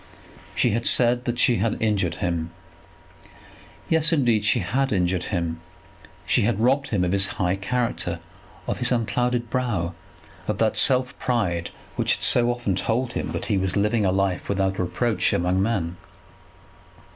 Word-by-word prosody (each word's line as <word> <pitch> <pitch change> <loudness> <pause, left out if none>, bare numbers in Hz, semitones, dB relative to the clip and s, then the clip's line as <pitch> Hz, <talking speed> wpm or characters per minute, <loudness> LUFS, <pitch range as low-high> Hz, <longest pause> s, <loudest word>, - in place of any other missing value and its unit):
She 120 - +2
had 115 +3 0
said 120 0 +3
that 120 -1 -2
she 120 0 +3
had 105 +4 0
injured 105 -5 0
him. 85 -2 -2 1.4
Yes, 160 0 +3
indeed, 120 -9 +2
she 105 - +2
had 130 +9 0
injured 90 -2 0
him! 85 -4 -3 0.6
She 120 - +2
had 110 0 +1
robbed 135 +4 +2
him 100 -5 0
of 90 - 0
his 100 0 +3
high 95 -2 +1
character, 100 -4 -2 0.5
of - - -3
his 125 - +1
unclouded 120 0 0
brow, 105 -9 -1 0.5
of - - -1
that - - +1
self 130 0 +2
pride 90 -9 -1 0.3
which - - +2
had - - -7
so 120 -1 +4
often 120 -6 -1
told 120 +5 -1
him - - -3
that - - -2
he 100 -4 +1
was 95 +1 -1
living 105 +2 +1
a 95 - +2
life 95 -1 -1
without 95 -1 0
reproach 90 +2 0
among 90 +2 +1
men. 95 -5 -1
105 Hz, 160 wpm, -24 LUFS, 90-120 Hz, 1.4 s, so